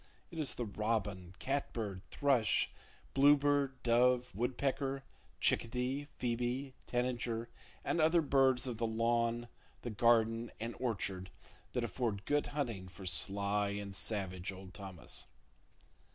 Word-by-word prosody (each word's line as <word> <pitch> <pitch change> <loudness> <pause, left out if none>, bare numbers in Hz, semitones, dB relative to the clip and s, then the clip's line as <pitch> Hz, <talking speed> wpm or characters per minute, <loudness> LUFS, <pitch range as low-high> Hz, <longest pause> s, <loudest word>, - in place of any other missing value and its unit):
It 165 - -6
is 145 -5 0
the 120 - -2
robin, 100 -4 -2
catbird, 115 -7 -2
thrush, 135 -7 +3 0.4
bluebird, 140 -1 +4
dove, 125 0 +4
woodpecker, 135 +4 -1 0.4
chickadee, 125 +4 +1
phoebe, 125 +3 -1
tanager 120 -2 -1 0.4
and 170 - +2
other 160 +1 +5
birds 135 -3 +4
of 120 -4 -4
the 115 - +1
lawn, 115 +1 +1 0.4
the 120 - -3
garden 115 +1 +3
and 115 +2 -3
orchard 95 -6 -1 0.4
that 125 - 0
afford 110 -2 -2
good 145 0 +2
hunting 120 -10 -2
for 95 +1 -10
sly 100 +2 +1
and 100 -1 -5
savage 95 -2 -2
old 95 0 -10
Thomas. 95 -4 -6
120 Hz, 120 wpm, -35 LUFS, 105-130 Hz, 0.4 s, other